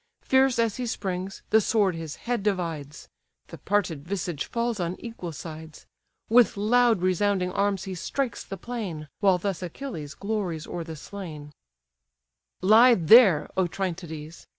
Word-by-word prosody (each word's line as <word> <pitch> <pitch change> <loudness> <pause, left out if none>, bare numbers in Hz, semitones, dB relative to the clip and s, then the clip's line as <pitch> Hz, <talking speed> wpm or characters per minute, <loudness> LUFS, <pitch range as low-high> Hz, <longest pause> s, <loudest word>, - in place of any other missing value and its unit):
Fierce 265 -1 +3
as 230 -3 +1
he 250 -1 -3
springs, 190 -3 -4
the 220 +1 +6
sword 205 -3 +2
his 165 -2 -6
head 245 -2 -3
divides: 165 -8 -3 0.4
The - - -10
parted 180 -8 -1
visage 175 -4 -3
falls 235 -2 -2
on 175 0 -2
equal 225 -7 -7
sides: 160 +1 -9 0.4
With 235 -1 +4
loud 225 -1 +3
resounding 185 0 +1
arms 200 -1 0
he 190 - -5
strikes 245 +8 -3
the 195 - -7
plain; 190 -12 -6
While 195 -3 +4
thus 190 -2 -3
Achilles 170 - -6
glories 195 -6 -3
o'er 175 - -5
the 160 -1 -8
slain: 155 -4 -9 1.1
"Lie 230 +5 +7
there, 185 -2 +6
Otryntides! 170 -4 -4
190 Hz, 140 wpm, -26 LUFS, 165-220 Hz, 1.1 s, Lie